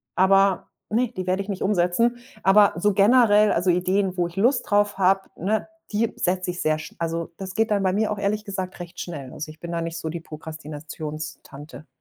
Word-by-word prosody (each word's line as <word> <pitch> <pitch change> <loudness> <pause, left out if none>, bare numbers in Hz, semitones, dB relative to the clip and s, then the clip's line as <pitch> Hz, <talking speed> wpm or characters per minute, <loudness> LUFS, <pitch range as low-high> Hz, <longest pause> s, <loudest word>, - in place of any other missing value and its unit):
aber 195 +1 +4 0.2
ne, 240 +4 +2
die 185 - -3
werde 185 +2 +1
ich 200 - -7
nicht 195 - -3
umsetzen. 205 +5 +2 0.3
Aber 200 +1 +6
so 205 +4 +2
generell 210 0 +5
also 175 +2 +1
Ideen, 185 +2 +1
wo 175 -1 +1
ich 170 - -13
Lust 245 +5 +2
drauf 205 -1 +2
habe, 190 0 +3 0.2
ne, 210 +5 -1 0.3
die 220 +2 +1
setze 180 0 0
ich 175 - -6
sehr 155 0 +1
sch 155 - -10
also 165 0 -2
das 190 -1 -7
geht 225 0 +1
dann 205 -1 +2
bei 185 -1 +2
mir 210 +2 +1
auch 210 - -2
ehrlich 205 +1 -1
gesagt 190 -3 -5
recht 175 +1 -9
schnell. 145 -7 -7
Also, 155 - -6
ich 155 - -17
bin 170 - -6
da 170 0 -2
nicht 165 0 -4
so 160 -1 -4
die 170 +2 -4
Prokrastinations-Tante. 155 -1 -8
185 Hz, 210 wpm, -24 LUFS, 165-205 Hz, 0.3 s, Aber